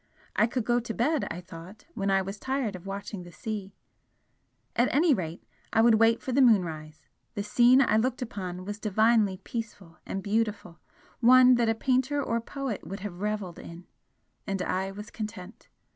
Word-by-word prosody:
I 215 Hz, -, +4 dB
could 245 Hz, -1 st, -3 dB
go 240 Hz, 0 st, +2 dB
to 230 Hz, -1 st, -6 dB
bed, 295 Hz, +5 st, +1 dB
I 175 Hz, -, -5 dB
thought, 180 Hz, +4 st, -12 dB
when 195 Hz, 0 st, -2 dB
I 195 Hz, 0 st, +3 dB
was 195 Hz, +2 st, -7 dB
tired 260 Hz, -6 st, -2 dB
of 185 Hz, +1 st, -10 dB
watching 200 Hz, 0 st, -5 dB
the 175 Hz, 0 st, -11 dB
sea. 200 Hz, -1 st, -6 dB, 1.0 s
At 240 Hz, -, +2 dB
any 310 Hz, +2 st, +4 dB
rate, 170 Hz, -5 st, -4 dB, 0.3 s
I 225 Hz, -, +4 dB
would 225 Hz, -2 st, +5 dB
wait 225 Hz, 0 st, +3 dB
for 260 Hz, -, -3 dB
the 270 Hz, +2 st, +3 dB
moonrise, 160 Hz, -10 st, +1 dB, 0.3 s
the 205 Hz, -, -2 dB
scene 245 Hz, +5 st, +5 dB
I 215 Hz, -3 st, +2 dB
looked 250 Hz, +2 st, 0 dB
upon 185 Hz, -5 st, -6 dB
was 205 Hz, +1 st, -5 dB
divinely 215 Hz, -1 st, +2 dB
peaceful 210 Hz, -7 st, -7 dB
and 195 Hz, -, -5 dB
beautiful, 210 Hz, -4 st, -2 dB, 0.4 s
one 255 Hz, +1 st, +7 dB
that 240 Hz, -2 st, +2 dB
a 225 Hz, -, +2 dB
painter 260 Hz, +4 st, +1 dB
or 235 Hz, -4 st, -1 dB
poet 265 Hz, -2 st, -5 dB
would 195 Hz, +1 st, -6 dB
have 185 Hz, -3 st, -6 dB
revelled 210 Hz, -4 st, -3 dB
in 170 Hz, +1 st, -11 dB, 0.6 s
and 195 Hz, -2 st, -2 dB
I 190 Hz, +1 st, -1 dB
was 210 Hz, +2 st, -9 dB
content. 210 Hz, -2 st, -8 dB
210 Hz, 180 wpm, -28 LUFS, 190-240 Hz, 1.0 s, one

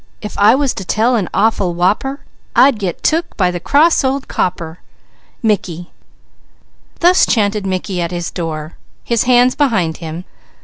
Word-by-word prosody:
If 210 Hz, -, -8 dB
I 210 Hz, +4 st, +6 dB
was 275 Hz, -1 st, 0 dB
to 195 Hz, -, -6 dB
tell 225 Hz, +6 st, +1 dB
an 200 Hz, -6 st, -1 dB
awful 200 Hz, -5 st, +1 dB
whopper, 210 Hz, +11 st, 0 dB, 0.3 s
I'd 265 Hz, -4 st, +5 dB
get 185 Hz, -5 st, -4 dB
took 330 Hz, +2 st, 0 dB
by 180 Hz, -3 st, +2 dB
the 175 Hz, -, -4 dB
cross 295 Hz, -, +3 dB
old 270 Hz, +1 st, -1 dB
copper._" 170 Hz, -2 st, -3 dB, 2.2 s
Thus 355 Hz, +2 st, +5 dB
chanted 205 Hz, -2 st, 0 dB
Mickey 185 Hz, -1 st, -3 dB
at 170 Hz, -, -2 dB
his 175 Hz, -1 st, -4 dB
door, 160 Hz, -2 st, -5 dB, 0.3 s
his 235 Hz, -1 st, 0 dB
hands 250 Hz, 0 st, +4 dB
behind 195 Hz, -, 0 dB
him. 165 Hz, +1 st, -7 dB
205 Hz, 145 wpm, -16 LUFS, 175-255 Hz, 2.2 s, I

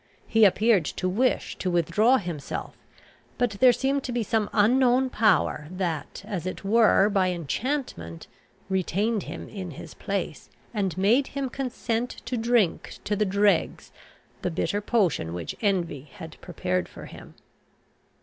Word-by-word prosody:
He 225 Hz, -1 st, +5 dB
appeared 205 Hz, -2 st, +4 dB
to 185 Hz, -, -3 dB
wish 240 Hz, +8 st, 0 dB
to 185 Hz, -, -2 dB
withdraw 210 Hz, +9 st, +3 dB
himself, 170 Hz, -, -5 dB, 0.6 s
but 245 Hz, -2 st, +1 dB
there 255 Hz, -1 st, +7 dB
seemed 270 Hz, +3 st, 0 dB
to 255 Hz, -, -3 dB
be 240 Hz, -1 st, 0 dB
some 215 Hz, 0 st, 0 dB
unknown 250 Hz, +4 st, +3 dB
power 190 Hz, -8 st, +2 dB
that, 180 Hz, -2 st, -4 dB
as 190 Hz, -5 st, -4 dB
it 185 Hz, -, -5 dB
were 215 Hz, -1 st, +5 dB
by 195 Hz, -3 st, +2 dB
enchantment, 175 Hz, -, -3 dB, 0.4 s
retained 195 Hz, +3 st, 0 dB
him -, -, -7 dB
in 190 Hz, -4 st, -6 dB
his 150 Hz, -, -10 dB
place, 195 Hz, -6 st, -4 dB, 0.2 s
and 195 Hz, -6 st, -1 dB
made 230 Hz, +9 st, +3 dB
him 270 Hz, -2 st, -1 dB
consent 245 Hz, -2 st, -2 dB, 0.2 s
to 255 Hz, -, -2 dB
drink 230 Hz, -6 st, +1 dB
to 210 Hz, -, -1 dB
the 210 Hz, +1 st, +1 dB
dregs 200 Hz, +1 st, +1 dB, 0.5 s
the -, -, -1 dB
bitter 175 Hz, +4 st, -1 dB
potion 185 Hz, -, 0 dB
which 85 Hz, -2 st, -5 dB
envy 170 Hz, -, -1 dB
had 160 Hz, -1 st, -10 dB
prepared 90 Hz, -, -2 dB
for -, -, -10 dB
him. -, -, -12 dB
205 Hz, 145 wpm, -26 LUFS, 175-235 Hz, 0.6 s, there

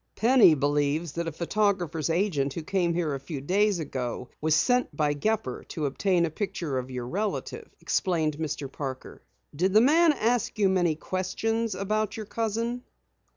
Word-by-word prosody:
"Penny 230 Hz, -8 st, +6 dB
believes 145 Hz, +2 st, 0 dB
that 170 Hz, +2 st, -3 dB
a -, -, -2 dB
photographer's 175 Hz, -2 st, 0 dB
agent 165 Hz, -6 st, 0 dB
who 165 Hz, -, -4 dB
came 175 Hz, -1 st, 0 dB
here 165 Hz, -4 st, 0 dB
a 135 Hz, -, -3 dB
few 140 Hz, +1 st, -6 dB
days 195 Hz, +7 st, +2 dB
ago 125 Hz, -5 st, -4 dB
was 155 Hz, 0 st, +3 dB
sent 245 Hz, -, +1 dB
by 150 Hz, -1 st, +2 dB
Gepper 145 Hz, -, -2 dB
to 155 Hz, -, -3 dB
obtain 175 Hz, +5 st, +1 dB
a 160 Hz, -, -4 dB
picture 160 Hz, -6 st, -3 dB
of 130 Hz, 0 st, -7 dB
your 125 Hz, -2 st, -5 dB
relative," 205 Hz, +8 st, -3 dB
explained 160 Hz, -5 st, 0 dB
Mr. 150 Hz, -3 st, -3 dB
Parker. 135 Hz, -3 st, -6 dB, 0.3 s
"Did 185 Hz, +5 st, +1 dB
the 215 Hz, -, +7 dB
man 320 Hz, +6 st, +5 dB
ask 235 Hz, -3 st, 0 dB
you 200 Hz, -2 st, +3 dB
many 175 Hz, -4 st, +2 dB
questions 210 Hz, +6 st, -2 dB
about 215 Hz, +2 st, -1 dB
your 215 Hz, -, -5 dB
cousin?" 230 Hz, +3 st, -2 dB
175 Hz, 165 wpm, -27 LUFS, 150-210 Hz, 0.3 s, the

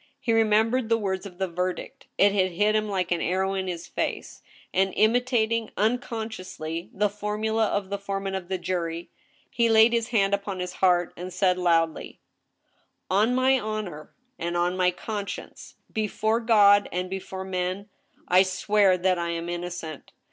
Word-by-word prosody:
He 230 Hz, -, 0 dB
remembered 225 Hz, +2 st, +2 dB
the 230 Hz, -, +4 dB
words 195 Hz, -2 st, -3 dB
of 180 Hz, -2 st, -14 dB
the 190 Hz, 0 st, -1 dB
verdict; 180 Hz, +1 st, -4 dB
it 200 Hz, 0 st, +5 dB
had 185 Hz, -3 st, +1 dB
hit 210 Hz, +4 st, +2 dB
him 215 Hz, -1 st, 0 dB
like 185 Hz, -3 st, -1 dB
an 175 Hz, -, +1 dB
arrow 190 Hz, +2 st, 0 dB
in 190 Hz, -1 st, -2 dB
his 175 Hz, -1 st, -4 dB
face, -, -, -4 dB, 0.3 s
and 190 Hz, 0 st, +1 dB
imitating, 230 Hz, -1 st, +2 dB
unconsciously, 215 Hz, -7 st, -3 dB
the 210 Hz, +2 st, +1 dB
formula 210 Hz, +2 st, -1 dB
of 200 Hz, -1 st, -2 dB
the 200 Hz, -, -2 dB
foreman 195 Hz, -1 st, -3 dB
of 190 Hz, -2 st, -4 dB
the 190 Hz, 0 st, -2 dB
jury, 175 Hz, -2 st, -3 dB, 0.4 s
he 235 Hz, -1 st, +2 dB
laid 225 Hz, +1 st, +6 dB
his 230 Hz, -1 st, +1 dB
hand 200 Hz, -4 st, +2 dB
upon 200 Hz, -1 st, -2 dB
his 180 Hz, 0 st, -4 dB
heart 175 Hz, -2 st, +2 dB
and 180 Hz, +1 st, -7 dB
said 185 Hz, 0 st, +1 dB
loudly: 165 Hz, -2 st, 0 dB, 0.5 s
" -, -, -20 dB
On 215 Hz, +6 st, +3 dB
my 260 Hz, +1 st, +3 dB
honor 210 Hz, -9 st, -5 dB, 0.3 s
and 170 Hz, +1 st, -2 dB, 0.2 s
my 185 Hz, -1 st, +3 dB
conscience, 200 Hz, +2 st, -6 dB, 0.2 s
befote 220 Hz, +1 st, -1 dB
God 205 Hz, -3 st, +6 dB
and 180 Hz, +1 st, -2 dB
before 190 Hz, 0 st, -6 dB
men 185 Hz, +2 st, -3 dB, 0.4 s
I 180 Hz, +1 st, +6 dB
swear 190 Hz, +1 st, +2 dB
that 180 Hz, 0 st, +1 dB
I 170 Hz, 0 st, -2 dB
am 170 Hz, 0 st, -3 dB
innocent. 175 Hz, -3 st, -6 dB
195 Hz, 165 wpm, -26 LUFS, 180-215 Hz, 0.5 s, laid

